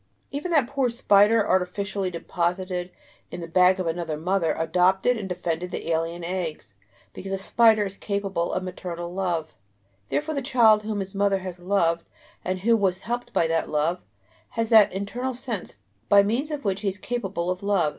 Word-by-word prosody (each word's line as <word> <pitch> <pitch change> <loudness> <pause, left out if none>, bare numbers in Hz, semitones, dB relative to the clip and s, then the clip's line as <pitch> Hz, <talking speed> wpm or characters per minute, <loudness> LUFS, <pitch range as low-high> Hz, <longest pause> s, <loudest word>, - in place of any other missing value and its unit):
Even 290 +5 -4
that 300 -7 +3
poor 270 0 0
spider, 210 -2 +4
artificially 190 +1 0
deposited 180 +1 -2 0.4
in 175 - -7
the 170 - -6
bag 185 +2 +4
of 185 - -1
another 165 -2 -2
mother, 170 0 0
adopted 180 +8 +2
and 200 -4 -5
defended 180 -1 -3
the 170 - -4
alien 165 +1 -1
eggs, 170 - -4 0.4
because 195 - -7
the 195 - -1
spider 220 +2 +4
is 195 0 -6
capable 195 -4 -2
of 185 - -2
maternal 175 -1 -6
love. 175 -8 -2 0.6
Therefore 310 +1 -1
the 280 - -2
child 230 -5 +4
whom 210 -1 -3
his 190 +1 -6
mother 200 0 +2
has 185 -1 -7
loved 175 -3 +1 0.4
and 185 0 -2
who 230 +3 +4
was 195 -3 0
helped 240 +1 -4
by - - +2
that 165 0 0
love, 155 +4 0 0.6
has 230 0 0
that 220 -3 +7
"internal 240 +7 -3
sense" 235 -6 -5 0.3
by 200 0 +7
means 240 +9 -1
of 295 -4 -5
which 195 0 0
he 210 - -2
is 195 0 -1
capable 195 -7 -3
of 185 - -4
love. 200 -6 +2
190 Hz, 180 wpm, -25 LUFS, 175-215 Hz, 0.6 s, that